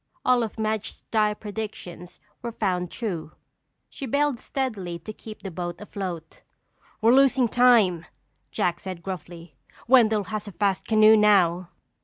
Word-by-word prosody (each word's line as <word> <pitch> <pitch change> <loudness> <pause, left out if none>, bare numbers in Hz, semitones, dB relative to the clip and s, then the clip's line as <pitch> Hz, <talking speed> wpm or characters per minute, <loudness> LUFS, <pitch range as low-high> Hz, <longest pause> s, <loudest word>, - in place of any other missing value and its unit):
All 250 -1 +4
of 225 -1 -4
Madge's 220 -1 -3
dire 210 -1 +2
predictions 205 -5 -7 0.2
were 235 -1 -4
found 180 -5 -1
true. 175 -9 -5 0.5
She 275 - -7
bailed 285 0 +1
steadily 205 -11 -4
to 170 +6 -9
keep 215 -2 -11
the 195 - -5
boat 175 0 -5
afloat. 185 -6 -7 0.6
"We're 225 +2 +5
losing 265 -2 +4
time," 225 -9 +4 0.4
Jack 175 -1 -1
said 185 -3 -7
gruffly. 175 -3 -8 0.3
"Wendell 220 -4 +5
has 215 +1 -5
a 205 - -8
fast 195 -1 -1
canoe 215 0 +6
now." 185 -5 +3
210 Hz, 140 wpm, -25 LUFS, 180-225 Hz, 0.6 s, canoe